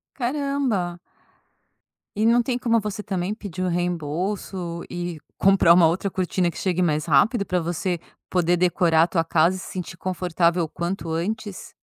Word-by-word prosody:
Caramba. 255 -9 -1 1.2
E 215 +2 +1
não 235 +1 +5
tem 245 +1 -1
como 230 -2 +2
você 210 0 -5
também 190 0 -2
pedir 195 -5 -7
o 185 - 0
reembolso 175 +1 -2
e 175 -2 -4 0.2
comprar 195 -3 +5
uma 170 -2 +6
outra 185 +4 -1
cortina 185 -1 0
que 165 - -9
chegue 185 -1 0
mais 155 -3 +1
rápido 200 - +3
pra 180 -2 0
você 175 +1 -2 0.3
poder 175 -1 +2
decorar 170 -2 +3
a - - +2
tua 165 -2 +1
casa 165 +3 +2
e - - -7
se - - -8
sentir 180 -2 -6
confortável 175 -1 0
o 160 - -4
quanto 170 0 -4
antes? 205 +4 -4
180 Hz, 165 wpm, -23 LUFS, 170-200 Hz, 1.2 s, uma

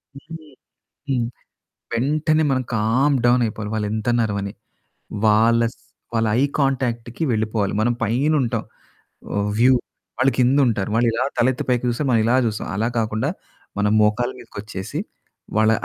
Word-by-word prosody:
హుహు. 155 +3 -10 0.6
హ్మ్, 120 -3 +1 0.7
వెంటనే 155 +6 +1
మనం 130 -1 +1
కామ్ 125 +7 +2
డౌన్ 120 0 +4
అయిపోవాలి. 105 -1 -5
వాళ్ళు 105 -1 -1
ఎంతన్న 120 +2 0
అరవని. 100 -1 -3 0.7
వాళ్ళ, 115 +2 +4 0.5
వాళ్ళ 115 -1 +1
ఐ - - +3 0.2
కాంటాక్ట్‌కి 125 -1 -1
వెళ్ళిపోవాలి. 110 -2 0
మనం 120 +2 +2
పైన 130 +8 +1
ఉంటాం. 115 -2 -1 0.9
వ్యూ 125 +3 +5 0.5
వాళ్ళు 135 +1 +4
కింద 125 +3 +4
ఉంటారు. 105 -4 -1
వాళ్ళు 120 +1 +3
ఇలా 120 - 0
తలెత్తి 125 +1 +1
పైకి 125 0 +1
చూస్తే 120 +5 -1
మనం 115 -3 +4
ఇలా 120 +2 +3
చూస్తాం. 110 -2 -2
అలా 110 +3 0
కాకుండా 110 +4 -1 0.5
మనం 105 0 +2
మోకాళ్ళ 110 +4 +2
మీదకి - - -13
వచ్చేసి, 100 -3 -6 0.6
వాళ్ళ 110 0 +4
115 Hz, 140 wpm, -21 LUFS, 110-130 Hz, 0.9 s, వ్యూ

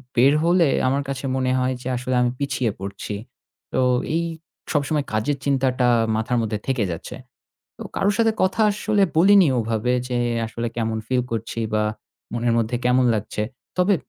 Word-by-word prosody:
বের 130 +4 +5
হলে 175 -1 +4 0.2
আমার 140 +2 +1
কাছে 135 0 -4
মনে 130 -1 0
হয় 130 0 +1
যে 125 - -6
আসলে 125 +1 -2
আমি 120 0 +2
পিছিয়ে 130 -5 0
পড়ছি। 100 +1 -6 0.6
তো - - +1 0.4
এই 170 - +1 0.5
সবসময় 145 0 0
কাজের 135 +7 0
চিন্তাটা 130 -2 +2 0.3
মাথার 115 +2 0
মধ্যে 110 -1 -2
থেকে 130 -5 +1
যাচ্ছে। 85 - -6 0.6
তো - - -6
কারো 200 - +2
সাথে 225 -1 +3
কথা 190 +4 +1
আসলে 210 0 +1
বলিনি 190 +1 +6
ওভাবে 115 +1 0 0.2
যে, 125 -1 -1 0.3
আসলে 115 +1 -4
কেমন 110 -1 -1
feel 125 0 +1
করছি 115 0 -3
বা 105 - +2 0.5
মনের 120 0 0
মধ্যে 115 +2 0
কেমন 125 +1 +4
লাগছে। 105 0 -3 0.3
তবে 185 +2 +3
130 Hz, 160 wpm, -22 LUFS, 115-145 Hz, 0.6 s, বলিনি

